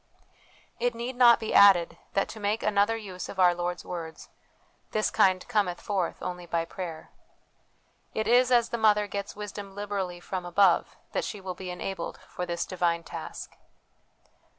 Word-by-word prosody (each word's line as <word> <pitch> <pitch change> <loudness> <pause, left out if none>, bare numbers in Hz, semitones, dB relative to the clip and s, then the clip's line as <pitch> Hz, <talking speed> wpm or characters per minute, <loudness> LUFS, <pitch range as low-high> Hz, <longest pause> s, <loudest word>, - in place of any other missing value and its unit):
It 240 0 0
need 240 +2 -4
not 240 -2 +7
be 220 - -3
added 195 -4 +6 0.2
that, 195 - +2
to 220 - -8
make 210 +2 -1
another 210 +2 +2
use 190 -4 -7
of 190 - -8
our 180 -1 +6
Lord's 175 0 -3
words, 165 -2 -7 0.3
" - - -38
this 215 0 +1
kind 185 -1 +3
cometh 205 -7 0
forth 190 -5 -2
only 180 -1 -5
by 165 0 0
prayer." 165 -2 -7 1.0
It 220 - -1
is 245 +1 +4
as 235 -2 +4
the 235 - -3
mother 210 -1 +4
gets 200 0 -5
wisdom 205 -1 -7
liberally 200 -3 -3
from 185 +1 -5
above, 175 +1 +3
that - - -1
she 210 - -5
will 190 -1 -5
be 185 0 -8
enabled 180 0 -5
for 180 - -5
this 170 0 -2
divine 170 -2 0
task. - - -8
195 Hz, 170 wpm, -28 LUFS, 180-215 Hz, 1.0 s, not